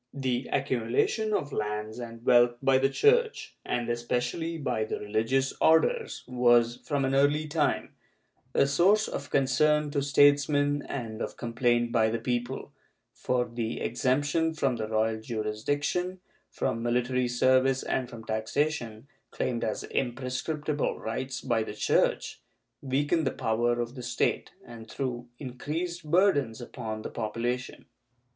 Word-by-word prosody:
The 130 -2 -1
accumulation 130 - 0
of 145 -8 -1
lands 105 +2 -3
and 115 0 -8
wealth 120 0 +5
by 135 0 +3
the 135 +1 +3
Church, 450 - +2
and 120 -1 -2
especially 125 +7 -2
by 125 -7 -1
the 110 - -4
religious 115 +6 0
Orders, 455 - +3
was, 120 -1 +3
from 145 -4 0
an 135 - 0
early 145 +3 +3
time, 150 -1 0 0.6
a - - +5
source 185 +10 +3
of 140 - -5
concern 145 +2 +2
to 145 -1 0
statesmen 145 +1 +3
and 115 -4 -5
of - - -4
complaint 120 0 +1
by 110 -2 +3
the 115 - -1
people, 120 +2 -3 0.4
for 125 -1 0
the 115 -1 -4
exemption 145 +7 0
from 135 -5 0
the 110 -1 -3
royal 110 0 0
jurisdiction, 145 +12 -2 0.3
from 115 - -2
military 125 +1 +1
service 130 +2 +3
and 130 -2 -2
from 115 -2 -10
taxation, 115 +2 -2 0.2
claimed 120 -2 -2
as 110 - -2
imprescriptible 135 +4 -2
rights 130 +3 -4
by 120 -3 0
the 110 -1 -5
Church, - - +1 0.4
weakened 145 +4 0
the - - +4
power 120 +2 0
of 120 0 -3
the 130 - -8
State - - -1 0.2
and 115 -2 -11
threw 125 -3 -4
increased 155 +6 -5
burdens 150 - +3
upon 110 -3 -6
the - - -6
population. 120 +3 -3
125 Hz, 140 wpm, -28 LUFS, 115-145 Hz, 0.6 s, wealth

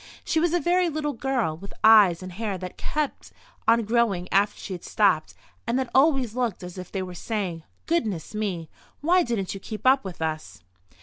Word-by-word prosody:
She 320 - +1
was 340 0 +2
a 350 - +2
very 350 +1 +2
little 300 -1 -2
girl, 245 -9 -1
with 195 +4 -11
eyes 205 -6 +7
and 185 - -7
hair 200 +1 -3
that 180 0 -6
had - - -5
kept 300 -2 -2 0.4
on 230 +1 +5
growing 215 -5 +1
after 205 +1 +3
she 190 - -6
had 175 - -7
stopped 190 -7 +1 0.3
and 235 +2 +1
that 260 -2 -2
always 265 -5 +3
looked 240 -7 -1
as 180 +1 -8
if 180 - -9
they 190 -2 -2
were 180 -1 -7
saying: 185 -3 -3 0.2
"Goodness 220 - -1
me! 195 -6 -3 0.3
Why 355 +5 +4
didn't 230 - -2
you 195 - -7
keep 215 +4 -8
up 265 +1 +5
with 190 -3 -7
us?" 155 - -4
215 Hz, 200 wpm, -25 LUFS, 185-265 Hz, 0.4 s, eyes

